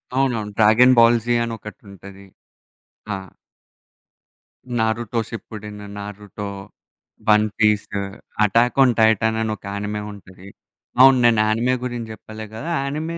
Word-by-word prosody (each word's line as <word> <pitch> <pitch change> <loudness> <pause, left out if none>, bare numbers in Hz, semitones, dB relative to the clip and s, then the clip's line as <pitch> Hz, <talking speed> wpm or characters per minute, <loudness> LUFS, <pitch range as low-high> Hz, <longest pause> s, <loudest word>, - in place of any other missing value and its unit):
అవునవును. 120 -6 0
'Dragon 115 +4 +6
Ball Z' 120 0 +4
అని 115 - -4
ఒకటుంటది. 100 -2 -12 0.9
ఆ! - - -2 1.6
'నారుటోషిప్పుడిన్', 110 -2 -4
'నారుటో 105 0 -7 0.8
వన్ 105 0 +5
పీసు', 105 -1 +1 0.4
'అటాకోన్ 120 +5 +4
టైటానని' 110 0 +2
ఒక - - -23
యానిమే 105 +1 -4
ఉంటది. 95 -1 -14 0.5
అవును. 135 0 +8
నేను 115 -2 +4
యానిమే 115 +4 +1
గురించి 120 -2 -5
జెప్పలే 110 0 -10
గదా! 140 +10 -6
యానిమే 155 +4 -4
110 Hz, 100 wpm, -21 LUFS, 105-120 Hz, 1.6 s, అవును